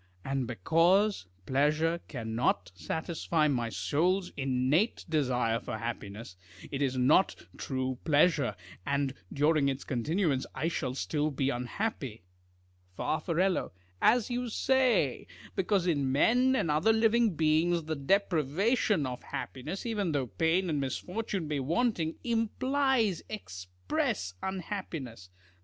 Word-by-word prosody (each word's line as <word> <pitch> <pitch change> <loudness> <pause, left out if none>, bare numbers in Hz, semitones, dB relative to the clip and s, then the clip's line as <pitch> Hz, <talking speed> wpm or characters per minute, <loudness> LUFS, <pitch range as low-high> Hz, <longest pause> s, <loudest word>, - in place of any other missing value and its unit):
And 135 -2 -1
because 165 - +2 0.2
pleasure 155 +6 +2
cannot 110 - -1
satisfy 160 - -1
my 120 -5 0
soul's 165 - 0
innate 135 - +1
desire 125 -7 +1
for 110 - -5
happiness, 110 -3 -6 0.4
it 140 - -3
is 130 -2 0
not 145 +9 +4 0.2
true 130 -1 -3
pleasure, 150 - +3 0.3
and 140 +1 0 0.2
during 150 -1 +3
its 135 0 -3
continuance 145 - 0
I 165 - 0
shall 130 -6 -3
still 150 +2 -1
be 140 -1 0
unhappy. 125 - -3 0.7
Far. 155 - -1 0.8
As 240 +1 +3
you 245 0 -2
say: 245 - +2 0.3
because 190 -1 +1
in 145 -6 +1
men 250 - +4
and 165 -11 +1
other 160 +9 +3
living 225 -2 +3
beings, 160 +2 +2
the 155 +1 -3
deprivation 185 - +1
of 125 -1 -5
happiness, 150 - -6
even 205 -8 -1
though 140 -3 0
pain 160 - +1
and 150 -4 0
misfortune 180 +6 -3
be 150 -1 -1
wanting, 165 - 0
implies 235 - +1
express 90 - -3
unhappiness. 165 - -5
155 Hz, 115 wpm, -30 LUFS, 130-190 Hz, 0.8 s, not